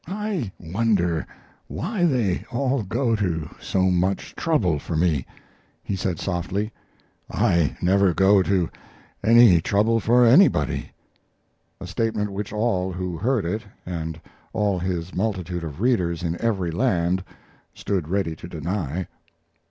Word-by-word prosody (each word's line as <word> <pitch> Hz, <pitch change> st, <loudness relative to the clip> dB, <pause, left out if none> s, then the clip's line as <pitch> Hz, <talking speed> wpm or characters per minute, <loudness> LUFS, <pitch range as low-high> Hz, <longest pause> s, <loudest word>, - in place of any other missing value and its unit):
"I 195 Hz, -, -3 dB
wonder 90 Hz, -2 st, 0 dB, 0.4 s
why 210 Hz, -6 st, -1 dB
they 115 Hz, -, 0 dB
all 130 Hz, +1 st, 0 dB
go 115 Hz, +4 st, 0 dB
to 85 Hz, -7 st, -1 dB
so 95 Hz, -1 st, +1 dB
much 90 Hz, +2 st, 0 dB
trouble 100 Hz, -, +1 dB
for 80 Hz, -, -5 dB
me," 80 Hz, -6 st, +1 dB, 0.6 s
he 100 Hz, -, -2 dB
said, 95 Hz, -3 st, -2 dB
softly. 95 Hz, +4 st, -2 dB, 0.6 s
"I 85 Hz, -4 st, +1 dB
never 95 Hz, +1 st, +4 dB
go 95 Hz, +3 st, +4 dB
to 95 Hz, -2 st, +1 dB, 0.6 s
any 115 Hz, -7 st, +7 dB
trouble 110 Hz, +6 st, +2 dB
for 120 Hz, +3 st, +4 dB
anybody" 115 Hz, -, +4 dB, 0.9 s
a -, -, -7 dB
statement 110 Hz, -3 st, -1 dB
which 100 Hz, +1 st, -5 dB
all 105 Hz, -4 st, 0 dB
who 90 Hz, -1 st, -4 dB
heard 115 Hz, +2 st, 0 dB
it, 105 Hz, +6 st, -2 dB, 0.2 s
and 80 Hz, -2 st, -4 dB, 0.3 s
all 100 Hz, -3 st, +1 dB
his 90 Hz, -1 st, -3 dB
multitude 90 Hz, -4 st, -2 dB
of 80 Hz, -1 st, -6 dB
readers 90 Hz, -9 st, +1 dB
in 85 Hz, -1 st, -1 dB
every 95 Hz, -7 st, 0 dB
land, 90 Hz, -3 st, +1 dB, 0.5 s
stood 95 Hz, -6 st, -2 dB
ready 95 Hz, -2 st, -1 dB
to 85 Hz, -, -9 dB
deny. 85 Hz, 0 st, -3 dB
95 Hz, 130 wpm, -23 LUFS, 85-115 Hz, 0.9 s, any